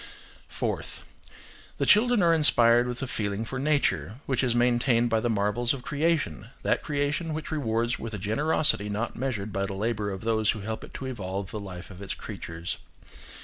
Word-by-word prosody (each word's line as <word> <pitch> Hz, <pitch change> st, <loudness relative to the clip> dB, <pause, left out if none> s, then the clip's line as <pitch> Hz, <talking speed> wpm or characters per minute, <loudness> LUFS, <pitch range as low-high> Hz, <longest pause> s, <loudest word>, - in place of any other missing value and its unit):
Fourth. -, -, -4 dB, 0.7 s
The -, -, +1 dB
children 230 Hz, -1 st, +5 dB
are 170 Hz, -1 st, +5 dB
inspired 120 Hz, -6 st, +6 dB
with 125 Hz, +2 st, -3 dB
a -, -, -2 dB
feeling 105 Hz, -1 st, -2 dB
for 130 Hz, +3 st, -4 dB
nature, 140 Hz, -7 st, +1 dB
which 130 Hz, -1 st, 0 dB
is 120 Hz, -2 st, +1 dB
maintained 120 Hz, 0 st, +3 dB
by 115 Hz, -, +3 dB
the 120 Hz, -, 0 dB
marvels 110 Hz, +4 st, +1 dB
of 125 Hz, -, -9 dB
creation–that 150 Hz, -, -1 dB
creation 150 Hz, +2 st, -1 dB
which 155 Hz, 0 st, -5 dB
rewards 120 Hz, -5 st, 0 dB
with 115 Hz, -2 st, -5 dB
a -, -, -3 dB
generosity 110 Hz, -, +1 dB
not 105 Hz, +3 st, -2 dB
measured 115 Hz, -5 st, -3 dB
by 100 Hz, 0 st, -1 dB
the 95 Hz, -, -5 dB
labour 105 Hz, 0 st, -1 dB
of 95 Hz, -1 st, -5 dB
those 110 Hz, -1 st, +1 dB
who 110 Hz, -, +1 dB
help 110 Hz, +2 st, -4 dB
it -, -, -12 dB
to 135 Hz, -, -5 dB
evolve 100 Hz, -6 st, -4 dB
the 105 Hz, -, -4 dB
life 95 Hz, -2 st, -8 dB
of 95 Hz, +1 st, -11 dB
its 100 Hz, -, -3 dB
creatures. 85 Hz, +1 st, -6 dB
115 Hz, 185 wpm, -27 LUFS, 105-135 Hz, 0.7 s, inspired